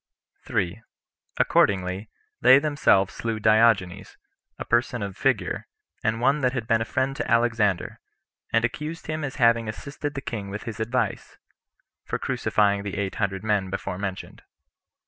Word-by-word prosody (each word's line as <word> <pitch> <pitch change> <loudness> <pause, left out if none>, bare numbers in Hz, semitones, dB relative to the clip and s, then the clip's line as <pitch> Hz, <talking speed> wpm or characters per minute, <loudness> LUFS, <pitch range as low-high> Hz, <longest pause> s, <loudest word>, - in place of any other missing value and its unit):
3. 90 +6 -1 0.6
Accordingly, 95 +1 +2 0.3
they 130 - +8
themselves 140 -10 +2
slew 115 -1 -3
Diogenes, 110 -4 +2 0.4
a - - -6
person 120 -1 +1
of 100 -2 -5
figure, - - 0 0.4
and 110 +1 0
one 140 +5 +2
that 125 -1 +1
had 125 -4 -3
been 115 0 +2
a - - -1
friend 130 +3 -1
to - - -4
Alexander; 115 -5 +1 0.5
and 115 0 +3
accused 150 +7 -5
him 155 0 -3
as 135 -2 -4
having 115 -3 +3
assisted 145 +6 -6
the - - -2
king 105 -6 -5
with 105 +2 -6
his 115 -2 -7
advice, 120 +3 -2 0.7
for - - -3
crucifying 100 -1 +1
the 100 -2 -5
eight 100 -2 -2
hundred 95 -1 -1
men 105 -3 0
[before 90 -1 -4
mentioned. 95 -2 -5
110 Hz, 150 wpm, -25 LUFS, 100-125 Hz, 0.7 s, they